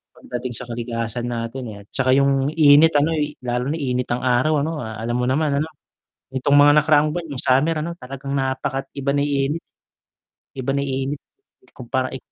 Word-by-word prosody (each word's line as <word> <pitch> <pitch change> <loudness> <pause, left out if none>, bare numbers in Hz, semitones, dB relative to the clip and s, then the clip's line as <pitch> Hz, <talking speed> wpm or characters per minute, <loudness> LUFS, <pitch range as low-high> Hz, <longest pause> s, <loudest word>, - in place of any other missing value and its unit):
Pagdating 125 0 -6
sa 125 - -3
kalikasan 120 0 -4
natin, 120 +2 -4
eh, - - -10
at - - -28
saka 130 0 +2
yung 140 -1 +3
init 155 0 +6
ano, 145 +3 +3
y 150 0 -2
lalo 125 +1 -1
na 150 - -1
init 125 -5 -2
ng 120 +1 -2
araw 130 +4 +2
ano, 160 0 -3
alam 115 -1 -4
mo 125 - 0
naman 140 +1 +1
ano. 155 - -1 0.7
Nitong 140 +2 +2
mga 145 0 +7
nakaraang 150 0 +3
buwan 170 0 -4
yung - - -3
summer 135 +5 +2
ano 170 +2 -3
talagang 135 0 -7
napakat 135 0 -2
iba 140 0 0
na 140 - +1
yung 145 0 0 0.2
init. 165 - -5 1.0
Iba 130 +1 -2
na 140 - 0
init 135 +1 -3 0.5
ikumpara, 130 +1 -3
i - - -3
135 Hz, 190 wpm, -21 LUFS, 125-145 Hz, 1.0 s, mga